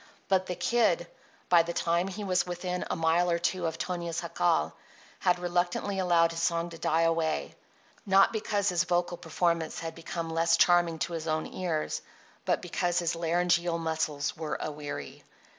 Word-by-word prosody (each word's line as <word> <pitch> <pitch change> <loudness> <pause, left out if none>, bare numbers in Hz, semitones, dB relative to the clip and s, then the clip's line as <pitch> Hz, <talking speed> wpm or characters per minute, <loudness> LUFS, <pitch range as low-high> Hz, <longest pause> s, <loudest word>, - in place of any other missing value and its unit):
So 190 - +6
the 180 -1 -5
Kid, 240 - +2 0.4
by 175 -2 +6
the 170 +1 -4
time 170 +2 +1
he 195 +2 -5
was 185 -2 +1
within 180 0 -3
a - - 0
mile 165 +2 +2
or 170 - +2
two 175 0 -1
of 160 - -4
Tonia's 175 -2 -3
jacal, - - +1 0.5
had 180 -1 +2
reluctantly 180 +2 -1
allowed 170 -2 +3
his 165 0 -4
song 170 0 0
to 165 - -10
die 160 +1 +2
away—not 165 - 0
because 205 -2 0
his 180 0 +1
vocal 175 0 0
performance 170 -2 -1
had 165 -1 -4
become 165 0 -5
less 165 0 +3
charming 175 -2 +4
to 170 - -8
his 165 -1 -4
own 155 0 0
ears, 170 -4 -2 0.4
but - - 0
because 175 -1 -1
his 170 -2 +1
laryngeal 170 0 +1
muscles 160 -3 -2
were 160 -1 -3
aweary. 145 -1 -6
170 Hz, 165 wpm, -29 LUFS, 165-180 Hz, 0.5 s, So